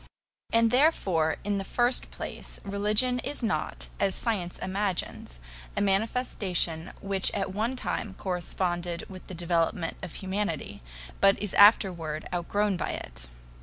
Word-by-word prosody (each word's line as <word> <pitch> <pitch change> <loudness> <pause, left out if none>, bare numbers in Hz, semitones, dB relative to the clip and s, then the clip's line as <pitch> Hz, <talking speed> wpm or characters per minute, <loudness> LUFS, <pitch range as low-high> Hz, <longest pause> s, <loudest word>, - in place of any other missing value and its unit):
And 230 0 +4
therefore, 195 - +3
in 205 0 0
the - - -3
first 245 +5 +1
place, - - -7
religion 210 +5 +1
is 275 +1 -4
not, 220 - -1
as 195 -1 +2
science 195 -7 -1
imagines, 190 - -3 0.4
a - - +2
manifestation 195 -5 +1
which 195 -1 +2
at 195 -2 -1
one 225 +6 0
time 210 -5 -3
corresponded 175 -2 -1
with 185 -1 -11
the 185 - -7
development 170 -1 0
of 180 -4 -7
humanity, 190 -5 -3 0.4
but 195 0 +5
is 205 -2 -3
afterward 175 -7 +5
outgrown 195 +3 0
by - - -2
it. - - -7
195 Hz, 130 wpm, -28 LUFS, 175-210 Hz, 0.4 s, but